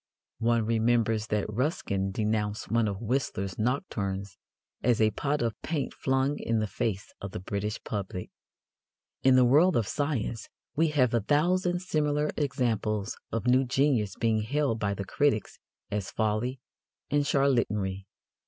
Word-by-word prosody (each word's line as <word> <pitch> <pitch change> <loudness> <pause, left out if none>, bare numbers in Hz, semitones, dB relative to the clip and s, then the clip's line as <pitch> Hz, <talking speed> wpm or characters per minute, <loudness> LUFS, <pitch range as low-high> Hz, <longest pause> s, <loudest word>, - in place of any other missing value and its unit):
One 115 -1 +2
remembers 115 -1 +2
that 105 -2 0
Ruskin 105 - -1
denounced 105 0 -1
one 115 -1 +3
of 100 +1 -4
Whistler's 105 -6 -2
nocturnes 100 - -2 0.5
as 120 -1 +2
a 110 -1 +4
pot 145 +2 -1
of 115 -2 -2
paint 155 -4 -2
flung 135 +2 0
in 115 - 0
the 110 - +1
face 105 -1 -3
of 100 -1 -6
the - - -4
British 100 +3 -3
public. 95 -3 -4 0.9
In 130 -1 +5
the 130 -1 +6
world 155 +9 +5
of 115 -4 +1
science 130 -6 -2 0.3
we 160 +2 +3
have 130 -6 +2
a 115 - +3
thousand 175 - +1
similar 150 -3 +1
examples 110 -6 -1 0.2
of 115 0 -2
new 125 +2 +4
genius 125 -6 +1
being 110 -2 +1
hailed 130 0 0
by 100 -1 0
the 100 - -4
critics 140 0 0 0.3
as 100 -2 -2
folly 110 +4 -1 0.5
and 145 0 +2
charlatanry. 105 -9 +1
115 Hz, 145 wpm, -28 LUFS, 105-140 Hz, 0.9 s, the